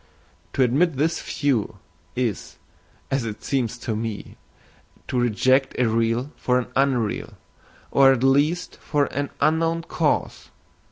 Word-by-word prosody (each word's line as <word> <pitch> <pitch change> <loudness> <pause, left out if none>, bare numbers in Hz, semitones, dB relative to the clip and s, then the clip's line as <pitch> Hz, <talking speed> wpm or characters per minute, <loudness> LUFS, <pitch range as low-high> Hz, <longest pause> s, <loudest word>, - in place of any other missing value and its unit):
To 135 - +3
admit 145 +6 +2
this 160 +4 0
view 130 -8 -1 0.4
is, 120 -5 -3 0.5
as 135 -2 +1
it 110 -2 -6
seems 125 -3 -1
to 120 -2 -3
me, 110 -1 -5 0.7
to 125 - -1
reject 130 +3 +2
a 125 - +3
real 115 +4 0
for 125 0 +1
an 125 -1 -2
unreal, 130 -5 0 0.5
or 135 -1 +6
at 130 -2 0
least 145 +6 +2
for 145 -2 0
an 145 0 -2
unknown 165 +1 +1
cause. - - -1
130 Hz, 130 wpm, -23 LUFS, 115-145 Hz, 0.7 s, or